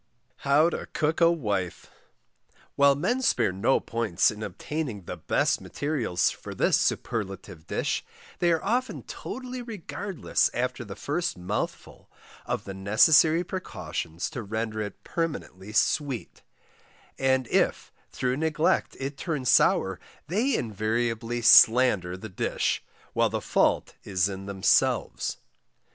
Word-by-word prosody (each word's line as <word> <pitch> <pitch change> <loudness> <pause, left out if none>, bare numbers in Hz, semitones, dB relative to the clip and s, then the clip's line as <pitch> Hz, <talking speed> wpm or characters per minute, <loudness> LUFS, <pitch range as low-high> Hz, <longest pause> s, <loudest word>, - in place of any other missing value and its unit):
HOW 150 +4 +3
TO - - -5
COOK 155 +2 0
A 170 0 +6
WIFE. 100 - -3 0.8
While 140 0 +5
MEN 235 - 0
spare 235 - +2
no 100 +8 +2
pains 115 -6 +1
in 105 0 -9
obtaining 130 - -4
the - - -6
BEST - - 0
MATERIALS 140 - -1
for - - -9
this - - +3
superlative 95 -6 -3
DISH, - - -1 0.4
they 175 -1 +3
are 165 - +1
often 250 +5 -1
totally 255 -1 -6
regardless 205 -4 -2
after 125 +1 -2
the 100 -3 -8
first 175 - -2
MOUTHFUL, 90 +4 -5 0.4
of - - -2
the 95 - -7
necessary 150 - +5
precautions 90 - -5
to 130 -6 -5
render 110 +1 -3
it 105 -2 -7
permanently 125 - -4
SWEET, 135 +2 0 0.8
and 130 -2 +2
if - - +1 0.2
through 125 0 -1
neglect 160 +1 +1
it 135 +1 -4
turn 150 -6 -3
sour - - +3 0.3
they 225 - +1
invariably 115 +2 -1
slander 110 -7 +6
the 110 - -8
Dish, 95 - -1 0.3
while - - +2
the - - -2
fault - - +1
is 95 -2 +1
in 95 0 -6
themselves. 95 -1 +1
125 Hz, 125 wpm, -27 LUFS, 100-160 Hz, 0.8 s, A